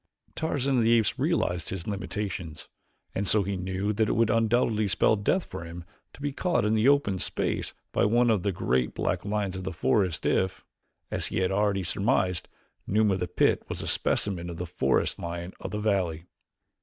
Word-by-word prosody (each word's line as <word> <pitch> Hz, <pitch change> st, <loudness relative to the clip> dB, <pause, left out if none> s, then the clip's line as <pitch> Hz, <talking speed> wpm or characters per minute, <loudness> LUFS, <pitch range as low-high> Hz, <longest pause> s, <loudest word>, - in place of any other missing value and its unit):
Tarzan 140 Hz, -4 st, 0 dB
of -, -, +3 dB
the 115 Hz, +1 st, +4 dB
Apes 110 Hz, -3 st, 0 dB
realized 90 Hz, -2 st, 0 dB
his 95 Hz, -3 st, -4 dB
limitations 95 Hz, -5 st, -4 dB, 0.5 s
and 100 Hz, +1 st, -2 dB
so 105 Hz, +3 st, +4 dB
he 100 Hz, +1 st, -2 dB
knew 95 Hz, +3 st, -2 dB
that 110 Hz, 0 st, +1 dB
it -, -, +2 dB
would 115 Hz, 0 st, +2 dB
undoubtedly 115 Hz, -1 st, +2 dB
spell 95 Hz, +3 st, +3 dB
death 110 Hz, -, 0 dB
for -, -, -7 dB
him 85 Hz, +1 st, -8 dB, 0.3 s
to -, -, -14 dB
be 145 Hz, -, 0 dB
caught 175 Hz, -2 st, 0 dB
in 105 Hz, -, +2 dB
the 110 Hz, +4 st, +4 dB
open 140 Hz, -10 st, +2 dB
space -, -, -2 dB, 0.2 s
by -, -, +1 dB
one 120 Hz, +2 st, +3 dB
of 105 Hz, -4 st, +2 dB
the 100 Hz, -, 0 dB
great 65 Hz, -7 st, 0 dB
black -, -, -1 dB
lions 100 Hz, -2 st, -2 dB
of 95 Hz, -, -6 dB
the 95 Hz, -, -3 dB
forest 95 Hz, 0 st, +1 dB
if, 95 Hz, -1 st, 0 dB, 0.5 s
as -, -, 0 dB
he -, -, -3 dB
had 95 Hz, -, +1 dB
already 100 Hz, -1 st, +1 dB
surmised, 95 Hz, -1 st, 0 dB, 0.4 s
Numa 105 Hz, 0 st, +3 dB
of 95 Hz, -, -1 dB
the 90 Hz, -, -2 dB
pit -, -, +2 dB
was -, -, -4 dB
a -, -, -4 dB
specimen 90 Hz, -4 st, +1 dB
of 85 Hz, -, -6 dB
the 90 Hz, -, -3 dB
forest 80 Hz, -6 st, 0 dB
lion 85 Hz, +1 st, -5 dB
of -, -, -5 dB
the 105 Hz, -, -4 dB
valley. 95 Hz, -6 st, 0 dB
100 Hz, 200 wpm, -27 LUFS, 90-110 Hz, 0.5 s, the